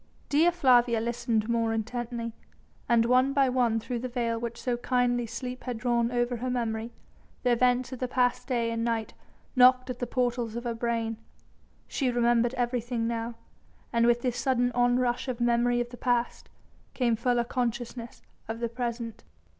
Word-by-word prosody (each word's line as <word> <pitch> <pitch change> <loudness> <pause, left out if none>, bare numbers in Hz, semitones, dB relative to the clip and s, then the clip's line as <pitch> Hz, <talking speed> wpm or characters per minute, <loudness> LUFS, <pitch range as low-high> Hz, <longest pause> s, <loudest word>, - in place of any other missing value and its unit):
Dea 315 +4 +5
Flavia 245 -8 +4
listened 230 -1 -1
more 230 -1 +1
intently, 230 +1 -3 0.6
and 230 -1 +4
one 255 +3 +3
by 275 -1 +4
one 245 -3 +2
through 240 +2 -4
the 255 - -3
veil 235 -2 -1
which 235 +2 -6
kindly 245 -2 +1
sleep 250 +2 -6
had 250 -3 -3
drawn 235 0 +1
over 240 0 0
her 255 +2 -3
memory, 230 -2 -2 0.5
the 250 - +3
events 250 +1 +2
of 260 - -6
the 255 - -1
past 245 0 +1
day 235 -3 0
and 230 0 -2
night 230 -2 -1 0.4
knocked 255 0 +5
at 245 - -8
the 245 - -2
portals 240 -2 -1
of 235 - -4
her 240 -1 -2
brain. 230 -1 -2 0.7
She 265 -3 -1
remembered 240 0 +2
everything 240 -1 -1
now, 230 0 -3 0.6
and 235 0 +3
with 240 0 +3
this 250 -2 -1
sudden 245 -2 +1
onrush 245 +1 +1
of 250 -2 -3
memory 240 0 +2
of 240 0 -2
the 245 - -9
past, 245 -1 -1 0.5
came 240 -3 +2
fuller 240 +1 +1
consciousness 240 -1 -4 0.2
of 225 +1 -4
the 235 -1 -1
present. 235 -1 -4
240 Hz, 170 wpm, -28 LUFS, 230-250 Hz, 0.7 s, Dea